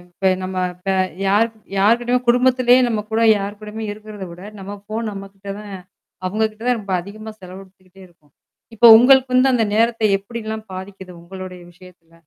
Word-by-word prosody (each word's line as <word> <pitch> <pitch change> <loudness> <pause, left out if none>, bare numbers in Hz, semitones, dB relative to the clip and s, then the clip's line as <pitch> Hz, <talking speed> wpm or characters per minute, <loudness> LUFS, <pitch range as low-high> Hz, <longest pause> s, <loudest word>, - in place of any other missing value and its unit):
இப்ப 190 +2 0
நம்ம, 185 0 -5 0.2
இப்ப 180 +2 -4 0.4
யார் 205 +4 +3 0.3
யார்கிட்டயுமே 240 +4 +2
குடும்பத்திலேயே 250 0 +4
நம்ம 215 -3 -2
கூட 225 +1 +1 0.2
யார் 200 +1 -6
கூடயுமே 215 +1 -7
இருக்கிறத 210 -2 -9
விட, 175 +2 -12 0.2
நம்ம 195 +1 -7
ஃபோன் 215 +1 -4
நம்மகிட்ட 195 0 -10
தான் 210 -1 -10 0.5
அவங்க 215 +4 0
கிட்ட 215 +1 -16
தான் 250 -1 +2
ரொம்ப 200 -2 -6
அதிகமா 215 +4 -10
செலவ 185 +1 -10
எடுத்துக்கிட்டே 190 0 -21
இருக்கோம். 155 -5 -30 0.4
இப்ப 230 +2 +5
உங்களுக்கு 260 +1 +5
வந்து 260 +1 +4
அந்த 230 -2 +2
நேரத்தை 230 0 +2
எப்படில்லாம் 220 +1 -7
பாதிக்குது? 190 0 -9
உங்களுடைய 185 0 -9
விஷயத்தில. 180 -2 -19
205 Hz, 160 wpm, -19 LUFS, 190-230 Hz, 0.5 s, இப்ப